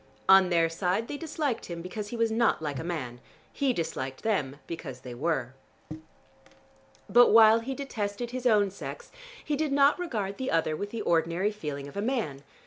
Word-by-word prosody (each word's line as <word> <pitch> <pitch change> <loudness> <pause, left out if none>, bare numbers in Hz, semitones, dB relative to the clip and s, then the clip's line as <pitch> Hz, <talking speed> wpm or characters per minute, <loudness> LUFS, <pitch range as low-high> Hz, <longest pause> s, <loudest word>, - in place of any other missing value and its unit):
On 190 -1 +7
their 165 -2 +3
side 180 +6 -1
they - - -5
disliked 300 -5 -3
him 170 -1 -6
because 205 +3 -5
he 235 - -6
was 230 -1 +1
not 230 0 +2
like 145 -4 -4
a - - -4
man: 130 -8 -4 0.3
he 275 -2 +1
disliked 135 - -4
them 150 -12 0
because 140 -6 -7
they 125 - -8
were. 130 -2 -2 1.5
But 245 0 +6
while 225 0 +7
he 260 +4 -5
detested 235 -4 -4
his 255 0 -1
own 205 -4 +3
sex, 480 - -8 0.3
he 300 - 0
did 300 0 -1
not 280 +3 +4
regard 215 - -3
the 260 - -2
other 160 -1 +1
with 205 +6 -4
the 230 +1 -5
ordinary 170 +4 +1
feeling 150 -9 -6
of 140 - -12
a 200 - -2
man. 215 - -2
200 Hz, 185 wpm, -28 LUFS, 165-240 Hz, 1.5 s, On